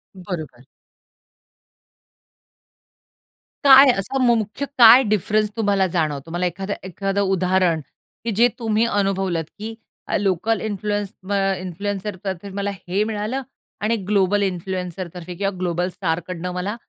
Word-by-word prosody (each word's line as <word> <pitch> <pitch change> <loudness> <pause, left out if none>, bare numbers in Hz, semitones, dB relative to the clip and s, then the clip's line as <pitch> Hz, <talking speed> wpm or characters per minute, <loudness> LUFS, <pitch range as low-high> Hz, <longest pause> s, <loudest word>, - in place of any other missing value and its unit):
बरोबर. 160 -10 -7 3.0
काय 270 -1 +9
असा 270 +8 -3
म - - +4
मुख्य 215 +5 -3
काय 240 +2 +9
डिफरन्स 215 0 +1
तुम्हाला 200 -3 +2
जाणवतो? 155 -2 -1
मला 175 +2 -1
एखाद 190 +3 -3
एखादं 195 +2 -2
उदाहरण 185 -3 +2 0.4
की 230 - -1
जे 235 +4 +5
तुम्ही 225 -1 +1
अनुभवलंत 195 -6 0
की 220 +2 -6 0.3
अ, - - +1
लोकल 200 +3 0
इन्फ्लुअन्स 205 -1 -2 0.2
अ, 195 -1 +2
इन्फ्लुएन्सर 200 +2 -4
तर्फे 190 0 -4
मला 200 0 -1 0.2
हे 190 +4 +1
मिळालं 220 +4 -2 0.4
आणि 215 +3 +1
ग्लोबल 205 0 +2
इन्फ्लुएन्सर 185 -1 -3
तर्फे 180 0 -8
किंवा 195 +2 -1
ग्लोबल 175 0 -1
स्टारकडनं 180 0 -3
मला 185 +4 -3
195 Hz, 125 wpm, -22 LUFS, 180-210 Hz, 3.0 s, काय